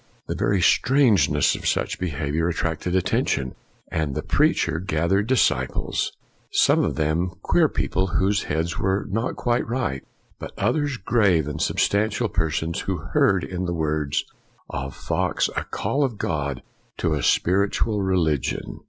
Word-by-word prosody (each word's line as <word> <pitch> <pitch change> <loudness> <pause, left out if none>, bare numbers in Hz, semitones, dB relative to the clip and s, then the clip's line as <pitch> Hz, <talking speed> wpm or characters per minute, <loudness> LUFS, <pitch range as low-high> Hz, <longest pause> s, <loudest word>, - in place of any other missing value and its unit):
The - - -3
very 100 -3 +1
strangeness 100 - +4
of - - -4
such - - -1
behavior 80 -1 -1
attracted 85 +1 -2
attention, 70 -7 0 0.4
and 75 -4 -1
the - - -2
preacher 80 - +2
gath 85 -1 -1
ered 100 +2 +2
disciples; 65 - +1 0.4
some - - +4
of - - -1
them 80 +4 0
queer - - +3
people 95 +1 -1
whose 95 +2 +1
heads 80 +4 -2
were 95 +1 0
not 115 +5 -1
quite 120 0 0
right, 115 - -2 0.4
but - - -8
others 145 -4 0
grave 95 - +2
and 75 - -4
substantial 110 +3 +1
persons 80 -1 -1
who 95 -2 -2 0.2
heard 95 -2 +3
in 90 0 -4
the 85 -1 -2
words 75 -3 -1 0.5
of 65 +1 -5
Fox - - -1
a - - -2
call 145 +2 -1
of 125 -6 -2
God 70 -7 -2 0.3
to 80 - 0
a 75 - -1
spiritual 100 - +1
religion. 85 -7 -1
90 Hz, 145 wpm, -23 LUFS, 75-100 Hz, 0.5 s, strangeness